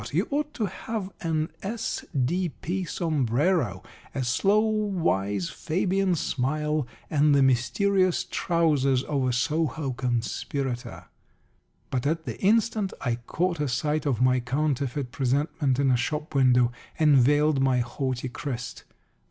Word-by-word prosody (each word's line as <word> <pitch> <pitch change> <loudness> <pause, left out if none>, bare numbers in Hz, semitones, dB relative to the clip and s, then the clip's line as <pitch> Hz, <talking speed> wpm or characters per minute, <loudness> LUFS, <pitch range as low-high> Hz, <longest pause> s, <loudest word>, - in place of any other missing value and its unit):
You 175 +8 +1
ought 295 +1 -1
to 220 - 0
have 200 +1 -5
an 160 -1 -1
S.D.P. 180 - -2
sombrero, 150 - 0 0.3
a 135 - -1
slow 195 - +3
wise 165 - 0
Fabian 185 +2 0
smile, 150 0 -1 0.2
and 150 -1 +4
the 140 - +5
mysterious 185 - +2
trousers 145 -7 +2
of 140 -4 -1
a - - +1
Soho 150 +2 0
conspirator." 125 0 -3 0.9
But 130 +1 0
at 160 +1 -1
the 115 -4 -6
instant 215 -1 +2
I 120 -3 -1
caught 175 -1 -1
a 150 - 0
sight 150 +4 -1
of 125 -3 +1
my 130 0 +4
counterfeit 135 0 -1
presentment 135 +1 0
in 135 -1 +3
a 125 - +4
shop 150 +5 -3
window, 125 -3 +4 0.3
and 150 -3 +5
veiled 145 +2 +3
my 130 -2 +3
haughty 130 +1 -3
crest. 125 -1 -6
145 Hz, 125 wpm, -26 LUFS, 125-170 Hz, 0.9 s, the